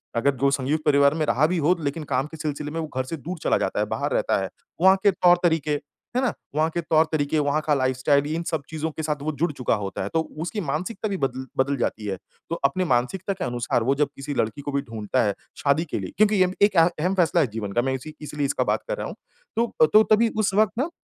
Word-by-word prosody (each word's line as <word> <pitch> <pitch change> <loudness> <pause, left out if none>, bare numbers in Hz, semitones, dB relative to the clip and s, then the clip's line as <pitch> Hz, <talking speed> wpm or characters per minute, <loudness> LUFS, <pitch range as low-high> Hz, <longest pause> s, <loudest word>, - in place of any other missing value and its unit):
अगर 140 +5 +3
जो 140 +2 +2
संयुक्त 140 +3 0
परिवार 140 -1 +5
में 155 - 0
रहा 150 +1 +3
भी 180 +1 -1
हो 180 - +5
लेकिन 145 +3 -2
काम 135 -1 0
के 160 - -11
सिलसिले 150 -1 -4
में 165 - -3
वो 160 - -3
घर 130 - +1
से 165 +5 -5
दूर 170 +5 -6
चला - - +3
जाता - - -1
है, - - +2
बाहर - - -2
रहता - - +1
है। - - -3 0.3
वहाँ 190 +1 +7
के 200 - +6
तौर-तरीके, 175 -4 +3 0.4
है 255 - +2
ना? 250 -6 +1 0.2
वहाँ 155 +1 +2
के 170 - +1
तौर-तरीके, 155 -2 +1
वहाँ 145 +1 +1
का 150 - +4
लाइफ़स्टाइल 130 +1 +2
भी 150 +2 -4
इन 170 - -2
सब 160 - -1
चीज़ों 160 0 -3
के 160 - -6
साथ 150 -2 -2
वो 155 - -1
जुड़ 170 - +2
चुका 125 -4 0
होता 95 - -4
है। 100 - -3
तो 160 - +3 0.2
उसकी 205 +5 -3
मानसिकता 185 +7 -3
भी 195 - -2
बदल 130 -1 -2 0.2
बदल 140 0 -2
जाती 110 -3 -2
है। 95 -2 -2 0.3
तो 170 - -1
अपने 180 +7 +1
मानसिकता 165 +10 0
के 190 - -5
अनुसार 120 -1 -1
वो 135 +3 +2
जब 150 0 +1
किसी 140 +1 -5
लड़की 110 +6 -1
को 145 - -4
भी 140 0 0
ढूँढ़ता 115 0 -1
है 100 -2 +1 0.3
शादी 145 +4 +2
के - - 0
लिए। - - -6
क्योंकि 205 -2 +4
अम 185 - -1
एक 205 0 +5
अहम 165 +1 +6
अहम 180 +4 +1
फैसला 175 -1 +3
है 140 - +2
जीवन 105 -3 -4
का। 120 - +2
मैं 135 +1 -1
इसी 140 +4 -6
इसलिए 150 -1 -3
इसका - - 0
बात - - 0
कर - - -2
रहा - - -4
हूँ। - - -7 0.4
तो 225 -9 +3
तो 215 - +8
तभी 225 +2 +5
उस 205 -2 +1
वक़्त 210 0 +3
ना 280 +6 0
155 Hz, 260 wpm, -24 LUFS, 135-175 Hz, 0.4 s, तो